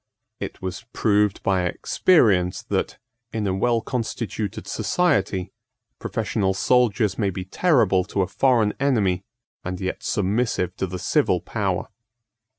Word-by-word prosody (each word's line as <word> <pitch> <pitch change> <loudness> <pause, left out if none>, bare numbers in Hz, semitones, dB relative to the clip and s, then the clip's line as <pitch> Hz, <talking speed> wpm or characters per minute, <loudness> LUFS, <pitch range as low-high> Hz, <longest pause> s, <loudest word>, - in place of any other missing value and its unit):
It - - -7
was 95 +2 -4
proved 105 -2 +2
by 95 -2 +1
experience 95 - +2
that, - - -2 0.3
in 110 -2 -2
a 95 - 0
well 115 +4 +1
constituted 110 -4 -4
society, 100 - 0 0.5
professional 95 -2 -1
soldiers 110 -3 +2
may 100 -3 +2
be 95 0 -5
terrible 110 - +3
to 100 -1 0
a - - -2
foreign 115 +1 +2
enemy, 105 -10 +1 0.4
and 90 0 -4
yet 95 -1 -3
submissive 100 -3 0
to 95 - -1
the 90 +1 -5
civil - - +1
power. - - -2
100 Hz, 130 wpm, -23 LUFS, 95-115 Hz, 0.5 s, terrible